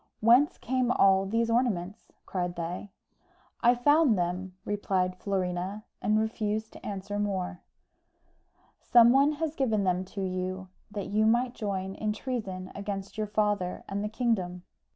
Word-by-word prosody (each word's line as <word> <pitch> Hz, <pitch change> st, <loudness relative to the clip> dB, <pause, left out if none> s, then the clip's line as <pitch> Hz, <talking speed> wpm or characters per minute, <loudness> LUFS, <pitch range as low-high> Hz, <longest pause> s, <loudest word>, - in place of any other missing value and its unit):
"Whence 240 Hz, +6 st, +5 dB
came 255 Hz, 0 st, 0 dB
all 195 Hz, -3 st, +4 dB
these 230 Hz, +3 st, +1 dB
ornaments?" 210 Hz, -5 st, -1 dB
cried 180 Hz, -2 st, -3 dB
they. 175 Hz, +4 st, -5 dB, 0.7 s
"I 240 Hz, +1 st, +5 dB
found 290 Hz, -1 st, +4 dB
them," 180 Hz, +1 st, -2 dB
replied 190 Hz, -3 st, 0 dB
Florina, 185 Hz, +1 st, -2 dB, 0.2 s
and 215 Hz, +1 st, +2 dB
refused 220 Hz, 0 st, -2 dB
to -, -, -13 dB
answer 205 Hz, 0 st, -4 dB
more. 190 Hz, -3 st, -2 dB, 1.2 s
"Some 235 Hz, -1 st, +6 dB
one 280 Hz, +3 st, +4 dB
has 310 Hz, 0 st, -2 dB
given 225 Hz, -9 st, +1 dB
them 185 Hz, -1 st, +1 dB
to 195 Hz, +1 st, -5 dB
you 185 Hz, 0 st, -3 dB, 0.2 s
that 205 Hz, -2 st, -5 dB
you 215 Hz, +2 st, +3 dB
might 240 Hz, +2 st, +2 dB
join 195 Hz, -4 st, -3 dB
in 210 Hz, +1 st, -2 dB
treason 210 Hz, -6 st, -4 dB
against 200 Hz, -1 st, -5 dB
your 215 Hz, -1 st, -2 dB
father 205 Hz, -3 st, 0 dB
and 200 Hz, +1 st, -3 dB
the 210 Hz, -, -2 dB
kingdom. 200 Hz, -7 st, -1 dB
205 Hz, 145 wpm, -29 LUFS, 185-230 Hz, 1.2 s, Some